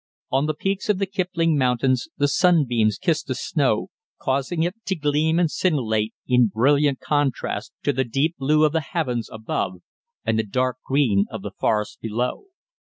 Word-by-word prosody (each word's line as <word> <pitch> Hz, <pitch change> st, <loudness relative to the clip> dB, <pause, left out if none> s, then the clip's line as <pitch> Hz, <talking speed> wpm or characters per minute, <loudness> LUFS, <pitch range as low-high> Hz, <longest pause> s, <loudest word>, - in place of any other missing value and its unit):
On 135 Hz, +3 st, +2 dB
the 155 Hz, -, -1 dB
peaks 195 Hz, +6 st, -2 dB
of 210 Hz, -, +3 dB
the 195 Hz, -, 0 dB
Kipling 175 Hz, -5 st, 0 dB
Mountains 130 Hz, +1 st, +1 dB
the 145 Hz, 0 st, +3 dB
sunbeams 135 Hz, -, +3 dB
kissed -, -, 0 dB
the -, -, -2 dB
snow, -, -, 0 dB, 0.3 s
causing 140 Hz, +5 st, 0 dB
it 175 Hz, +2 st, 0 dB
to 190 Hz, -, 0 dB
gleam 155 Hz, +1 st, +1 dB
and 170 Hz, -3 st, +2 dB
scintillate 110 Hz, -, 0 dB
in 125 Hz, -2 st, +4 dB
brilliant 140 Hz, +6 st, +2 dB
contrast 145 Hz, -4 st, -1 dB
to 145 Hz, -, +1 dB
the 130 Hz, +1 st, +1 dB
deep 140 Hz, +7 st, 0 dB
blue 150 Hz, +3 st, +3 dB
of 150 Hz, -, +2 dB
the 160 Hz, +1 st, 0 dB
heavens 130 Hz, -7 st, -2 dB
above 95 Hz, -4 st, -3 dB, 0.4 s
and 110 Hz, -, +1 dB
the -, -, +2 dB
dark 125 Hz, +4 st, -1 dB
green 120 Hz, -8 st, +2 dB
of -, -, -7 dB
the -, -, -5 dB
forests 105 Hz, -1 st, -1 dB
below. 120 Hz, -, -2 dB
140 Hz, 170 wpm, -23 LUFS, 120-160 Hz, 0.4 s, in